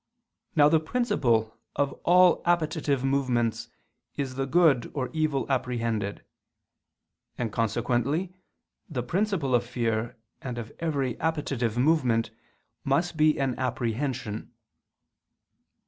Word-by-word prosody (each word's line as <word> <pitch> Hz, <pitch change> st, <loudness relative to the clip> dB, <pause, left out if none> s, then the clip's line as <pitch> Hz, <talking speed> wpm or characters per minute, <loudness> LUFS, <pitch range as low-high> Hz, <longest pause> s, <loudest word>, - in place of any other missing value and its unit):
Now 145 Hz, -2 st, +6 dB
the 160 Hz, +1 st, +4 dB
principle 130 Hz, -, 0 dB, 0.2 s
of 140 Hz, -1 st, 0 dB
all 180 Hz, +1 st, +5 dB
appetitive 155 Hz, -5 st, +1 dB
movements 130 Hz, -4 st, 0 dB, 0.5 s
is 135 Hz, -2 st, -3 dB
the 135 Hz, +1 st, -2 dB
good 150 Hz, -5 st, +3 dB
or 130 Hz, -3 st, -2 dB
evil 155 Hz, -4 st, 0 dB
apprehended: 115 Hz, -6 st, -2 dB, 1.1 s
and 115 Hz, -3 st, -2 dB
consequently 120 Hz, -, 0 dB, 0.6 s
the 130 Hz, -7 st, -3 dB
principle 180 Hz, -, 0 dB
of 120 Hz, -1 st, +4 dB
fear 115 Hz, -1 st, -2 dB, 0.2 s
and 125 Hz, -2 st, -5 dB
of 115 Hz, -2 st, -6 dB
every 140 Hz, -7 st, -1 dB
appetitive 140 Hz, -8 st, -1 dB
movement 125 Hz, -6 st, +2 dB, 0.5 s
must 165 Hz, +6 st, +1 dB
be 155 Hz, -1 st, +3 dB
an 135 Hz, -2 st, +1 dB
apprehension. 120 Hz, -3 st, -2 dB
135 Hz, 105 wpm, -27 LUFS, 120-155 Hz, 1.1 s, Now